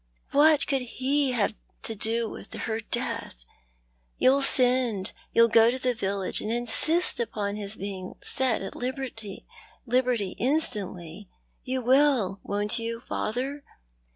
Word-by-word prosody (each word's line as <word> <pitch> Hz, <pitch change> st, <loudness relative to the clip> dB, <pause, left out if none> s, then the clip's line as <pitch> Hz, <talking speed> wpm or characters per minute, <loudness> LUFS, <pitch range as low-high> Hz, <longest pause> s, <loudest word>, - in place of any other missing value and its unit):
What 300 Hz, +1 st, +5 dB
could 275 Hz, -3 st, 0 dB
he 265 Hz, +2 st, -1 dB
have 220 Hz, -3 st, 0 dB, 0.3 s
to 225 Hz, -, 0 dB
do 225 Hz, +2 st, 0 dB
with -, -, -10 dB
her 220 Hz, -1 st, -3 dB
death? -, -, -4 dB, 0.7 s
Youll 270 Hz, +2 st, +4 dB
send— 250 Hz, -7 st, +4 dB, 0.2 s
you'll 230 Hz, 0 st, +5 dB
go 225 Hz, 0 st, +5 dB
to 250 Hz, -, -1 dB
the 255 Hz, -1 st, 0 dB
village, 195 Hz, -4 st, -1 dB
and 215 Hz, -, -3 dB
insist 240 Hz, +9 st, +1 dB
upon 210 Hz, -3 st, -3 dB
his 205 Hz, 0 st, -1 dB
being 190 Hz, -2 st, -6 dB
set 255 Hz, -6 st, 0 dB
at 195 Hz, -, -6 dB
liberty 245 Hz, -5 st, -6 dB, 0.9 s
instantly? 205 Hz, -, -1 dB, 0.3 s
You 260 Hz, -1 st, -3 dB
will, 255 Hz, -7 st, +3 dB
wont 205 Hz, +3 st, 0 dB
you, 230 Hz, 0 st, -4 dB
father 260 Hz, +5 st, -4 dB
230 Hz, 125 wpm, -26 LUFS, 205-260 Hz, 0.9 s, What